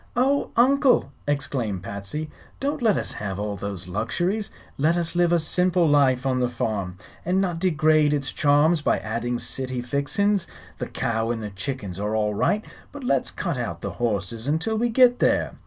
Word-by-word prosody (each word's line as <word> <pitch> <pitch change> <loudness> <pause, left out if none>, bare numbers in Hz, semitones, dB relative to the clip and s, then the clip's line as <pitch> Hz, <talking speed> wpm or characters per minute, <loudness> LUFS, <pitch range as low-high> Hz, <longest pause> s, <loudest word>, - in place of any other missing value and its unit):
"Oh, 270 +4 +2
Uncle!" 255 - +4 0.2
exclaimed 125 -9 -2
Patsy; 100 +11 -5 0.3
"don't 285 +1 -2
let 220 -4 +3
us - - -3
have 95 -2 -4
all 105 0 -3
those 95 -2 -5
luxuries. 175 - -1 0.3
Let 155 +5 +2
us 170 -1 -1
live 175 -1 +2
a 175 - +5
simple 180 +1 +2
life 135 -3 +3
on 130 -1 +1
the 125 -1 +1
farm, 100 -6 -3 0.3
and 180 +2 +1
not 180 -4 -1
degrade 155 -4 +3
its 145 -2 -1
charms 150 +3 +3
by - - +2
adding 120 +2 -2
city 130 0 -3
fixin's. 145 +10 0 0.3
The - - -3
cow 115 0 -1
and 115 -2 -2
the 105 - -5
chickens 100 -2 -5
are 105 +2 -1
all 105 -1 +1
right, 210 - +1 0.3
but 290 -1 -9
let's 135 - +1
cut - - -3
out - - -4
the - - -4
horses 110 +1 -2
until 160 +9 0
we 235 +2 +1
get 245 +1 +5
there. - - +2
145 Hz, 180 wpm, -24 LUFS, 110-180 Hz, 0.3 s, a